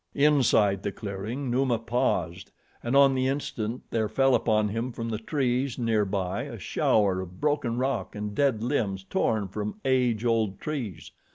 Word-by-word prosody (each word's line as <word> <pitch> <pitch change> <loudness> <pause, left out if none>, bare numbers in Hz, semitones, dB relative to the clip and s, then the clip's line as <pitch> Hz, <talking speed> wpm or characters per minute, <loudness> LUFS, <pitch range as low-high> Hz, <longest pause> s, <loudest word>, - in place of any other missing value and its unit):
Inside 125 -9 +3
the 100 - -2
clearing, 110 +7 -5
Numa 125 -1 +2
paused 115 +2 -1 0.3
and 120 +3 -1
on 140 -1 +6
the 130 0 +1
instant 125 -4 -3
there 110 -2 0
fell 135 -1 +3
upon 110 -3 +2
him 115 +4 -3
from 115 0 -5
the 110 -2 -2
trees 130 0 -1
near 115 -4 +1
by 95 -1 -2
a - - -7
shower 95 -3 +1
of 90 0 -10
broken 145 -6 0
rock 125 -7 -2
and 105 0 -4
dead 130 -4 +1
limbs 105 -7 -1
torn 105 +1 0
from 105 - -5
age 125 -4 +2
old 110 -4 +1
trees. 130 - -5
115 Hz, 165 wpm, -27 LUFS, 105-130 Hz, 0.3 s, on